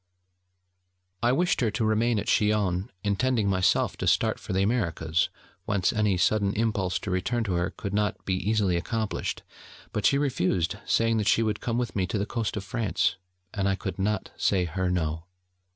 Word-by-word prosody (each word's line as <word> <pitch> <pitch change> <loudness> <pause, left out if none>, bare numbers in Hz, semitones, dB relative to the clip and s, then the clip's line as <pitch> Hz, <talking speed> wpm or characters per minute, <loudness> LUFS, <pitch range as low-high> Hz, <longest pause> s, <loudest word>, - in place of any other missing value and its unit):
I 120 - +3
wished 175 +5 +1
her 115 - +2
to 110 +1 -1
remain 110 +2 +2
at 105 - -2
Chillon, 105 -3 +1
intending, 110 +2 +1
myself, 95 -1 +2
to - - -3
start - - +2
for - - -7
the 95 +1 +2
Americas, 85 -7 0 0.4
whence 100 -4 +1
any 105 -3 +2
sudden 100 +1 +2
impulse 105 -5 0
to 100 - -5
return 115 +6 0
to 100 -4 -2
her 85 0 0
could 100 - -6
not 105 -1 -1
be 95 - 0
easily 95 -1 +1
accomplished: 110 +4 -3 0.5
but 105 - +2
she 140 - +3
refused, 95 - 0
saying 115 0 +2
that 105 -1 0
she 115 - +4
would 105 -2 -1
come 115 -1 -1
with 120 -6 -2
me 95 -3 0
to 105 - -2
the 100 - 0
coast 110 -1 -2
of 100 - -3
France: 95 -6 0 0.4
and 100 -1 0
I 95 - +1
could 95 0 -5
not 105 +1 -1
say 90 -2 +2
her 90 +2 -1
no. 80 -2 -1
100 Hz, 185 wpm, -27 LUFS, 95-110 Hz, 0.5 s, she